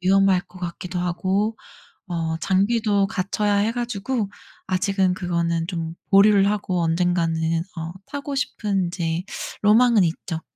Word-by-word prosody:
위험할 195 Hz, 0 st, +4 dB
것 185 Hz, 0 st, -16 dB
같기도 180 Hz, +1 st, -5 dB
하고 190 Hz, +5 st, 0 dB, 0.5 s
어 165 Hz, -2 st, -2 dB
장비도 200 Hz, +1 st, +2 dB
갖춰야 205 Hz, 0 st, 0 dB
해 210 Hz, +3 st, +2 dB
가지고 235 Hz, -2 st, -2 dB, 0.4 s
아직은 190 Hz, 0 st, +1 dB
그거는 170 Hz, -2 st, -1 dB
좀 165 Hz, -3 st, -4 dB, 0.2 s
보류를 200 Hz, 0 st, +6 dB
하고 185 Hz, -4 st, -1 dB
언젠가는 165 Hz, 0 st, +1 dB, 0.4 s
어 165 Hz, 0 st, -4 dB, 0.2 s
타고 285 Hz, 0 st, -5 dB
싶은 200 Hz, -8 st, -1 dB
이제 170 Hz, -1 st, -2 dB, 0.4 s
로망은 220 Hz, 0 st, +5 dB
있죠. 165 Hz, 0 st, -3 dB
190 Hz, 275 characters per minute, -23 LUFS, 175-205 Hz, 0.5 s, 보류를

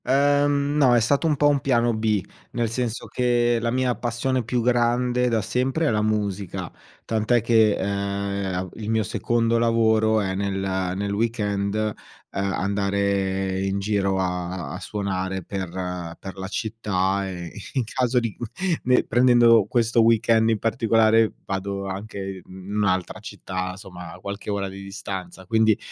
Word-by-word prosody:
Ehm, 145 Hz, +1 st, +2 dB
no, 130 Hz, -5 st, +5 dB
è -, -, +5 dB
stato 140 Hz, +8 st, +2 dB
un 155 Hz, -, +2 dB
po' 145 Hz, -, +4 dB
un 145 Hz, -1 st, +3 dB
piano 120 Hz, -3 st, +2 dB
B, 110 Hz, -3 st, 0 dB, 0.3 s
nel 120 Hz, -2 st, -1 dB
senso 120 Hz, -1 st, -2 dB
che 120 Hz, -1 st, +1 dB
la 115 Hz, -, 0 dB
mia 125 Hz, 0 st, +1 dB
passione 125 Hz, +2 st, -1 dB
più 120 Hz, +1 st, -1 dB
grande 125 Hz, +1 st, +2 dB
da 115 Hz, -2 st, +1 dB
sempre 130 Hz, +8 st, 0 dB
è -, -, +3 dB
la 105 Hz, -1 st, +1 dB
musica, 100 Hz, -4 st, -2 dB, 0.3 s
tant'è 110 Hz, +2 st, +1 dB
che, 110 Hz, -2 st, +4 dB
ehm, 100 Hz, -1 st, -2 dB
il 110 Hz, -1 st, -6 dB
mio 110 Hz, -1 st, +2 dB
secondo 115 Hz, +1 st, +1 dB
lavoro 110 Hz, -1 st, +3 dB
è 95 Hz, -2 st, -1 dB
nel 100 Hz, +1 st, -1 dB, 0.4 s
nel 100 Hz, +1 st, -2 dB
weekend, 105 Hz, -2 st, -1 dB
ehm, 110 Hz, -1 st, 0 dB, 0.4 s
andare 100 Hz, -1 st, 0 dB
in 95 Hz, 0 st, -1 dB
giro 100 Hz, -1 st, 0 dB
a 90 Hz, -1 st, -3 dB
a 90 Hz, -, -5 dB
suonare 95 Hz, -2 st, -3 dB
per 95 Hz, 0 st, -4 dB, 0.5 s
per 95 Hz, -, -8 dB
la 95 Hz, 0 st, -5 dB
città 100 Hz, -2 st, -1 dB
e 85 Hz, -2 st, -6 dB, 0.2 s
in 130 Hz, -, +1 dB
caso 125 Hz, +2 st, +1 dB
di 115 Hz, -3 st, -3 dB
cu 120 Hz, -, -5 dB, 0.4 s
ne 125 Hz, 0 st, +3 dB
prendendo 120 Hz, -2 st, +5 dB
questo 115 Hz, 0 st, +2 dB
weekend 115 Hz, 0 st, +4 dB
in 110 Hz, -, +2 dB
particolare 115 Hz, -1 st, +3 dB
vado 100 Hz, 0 st, -3 dB
anche 100 Hz, +3 st, -6 dB
i 95 Hz, -1 st, -5 dB
in 95 Hz, +2 st, -8 dB
un'altra 95 Hz, -3 st, 0 dB
città, 90 Hz, 0 st, -5 dB
somma 90 Hz, -3 st, -10 dB
qualche 100 Hz, +2 st, -6 dB
ora 100 Hz, -1 st, -1 dB
di 95 Hz, +1 st, -9 dB
distanza. 95 Hz, -2 st, -7 dB
Quindi 110 Hz, +1 st, +3 dB
105 Hz, 155 wpm, -24 LUFS, 95-120 Hz, 0.5 s, no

